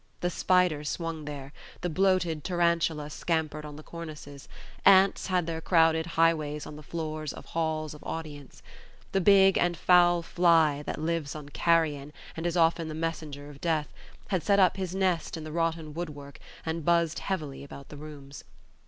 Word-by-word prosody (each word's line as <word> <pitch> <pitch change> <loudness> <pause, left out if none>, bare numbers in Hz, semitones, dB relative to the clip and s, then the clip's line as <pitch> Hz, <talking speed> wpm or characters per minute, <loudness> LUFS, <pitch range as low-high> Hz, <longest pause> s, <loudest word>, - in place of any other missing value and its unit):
The 175 - 0
spider 180 -5 +2
swung 165 0 -4
there; 145 -1 -7 0.3
the 180 - -1
bloated 180 -3 +1
tarantula 170 -4 0
scampered 155 -2 -2
on 150 -1 -8
the 155 - -11
cornices; 150 -4 -9 0.4
ants 195 0 +5
had 180 -3 +1
their 165 -1 -4
crowded 160 -1 +3
highways 155 -3 +2
on 150 - -9
the 150 - -10
floor 155 0 -5
of - - -10
halls 155 -2 -2
of 150 - -13
audience; 150 -4 -7 0.5
the 195 - +1
big 195 0 +6
and 175 -1 +1
foul 175 -1 +4
fly, 165 -4 +3
that - - -3
lives 160 -2 -2
on 150 -2 -8
carrion 150 -3 +1 0.2
and 165 +1 -2
is 175 +1 -1
often 165 0 +3
the 155 - -5
messenger 155 -3 -4
of 145 -1 -13
death, 160 -3 0 0.4
had 190 -4 0
set 200 +3 +3
up 185 -2 +5
his 190 -2 -4
nest 185 -4 0
in 160 - -7
the 155 - -7
rotten 165 -1 -2
woodwork, 145 -4 -7 0.3
and 160 0 -3
buzzed 170 0 +2
heavily 155 -8 -4
about 140 -1 -11
the 150 - -10
rooms. 145 -2 -10
160 Hz, 170 wpm, -28 LUFS, 150-170 Hz, 0.5 s, big